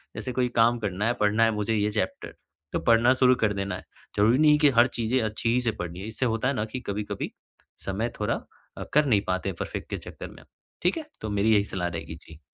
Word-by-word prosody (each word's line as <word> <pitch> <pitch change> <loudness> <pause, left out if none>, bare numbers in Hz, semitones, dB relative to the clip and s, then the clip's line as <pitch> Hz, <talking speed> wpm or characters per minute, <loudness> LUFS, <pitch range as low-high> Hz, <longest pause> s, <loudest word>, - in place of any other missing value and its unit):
जैसे 125 - -4
कोई 125 0 +1
काम 120 +1 +4
करना 105 -1 -2
है, 120 - +2
पढ़ना 105 +2 +3
है 115 - +4
मुझे 105 +2 0
ये 105 0 +1
चैप्टर, 105 -3 -3 0.4
तो - - +1
पढ़ना 115 +2 +4
शुरू 130 -1 +5
कर 105 -2 +3
देना 100 0 -3
है। - - -10 0.3
ज़रूरी 110 +5 +4
नहीं 155 -1 +6
है 150 - +5
कि 150 -1 +6
हर 120 +2 +7
चीज़ें 120 +3 +1
अच्छी 110 +1 -1
ही 125 - +2
से 120 - 0
पढ़नी 90 0 -5
है, 100 - -6
इससे 115 +3 -2
होता 115 +1 0
है 140 - +1
ना 105 - -1
कि 110 +4 -6
कभी-कभी 100 +1 -3 0.5
समय 105 +5 -1
थोड़ा 105 - 0 0.4
अ, - - -4
कर 150 0 +5
नहीं 110 -7 +3
पाते 95 +1 -1
परफ़ेक्ट - - -5
के - - -3
चक्कर - - -9
में, - - -15 0.4
ठीक 180 +2 +2
है? 320 - -5 0.2
तो 110 - -4
मेरी 105 +2 +2
यही 100 -1 +4
सलाह 90 -3 -3
रहेगी 85 -1 -6
जी। 80 -2 -15
110 Hz, 245 wpm, -26 LUFS, 100-120 Hz, 0.5 s, हर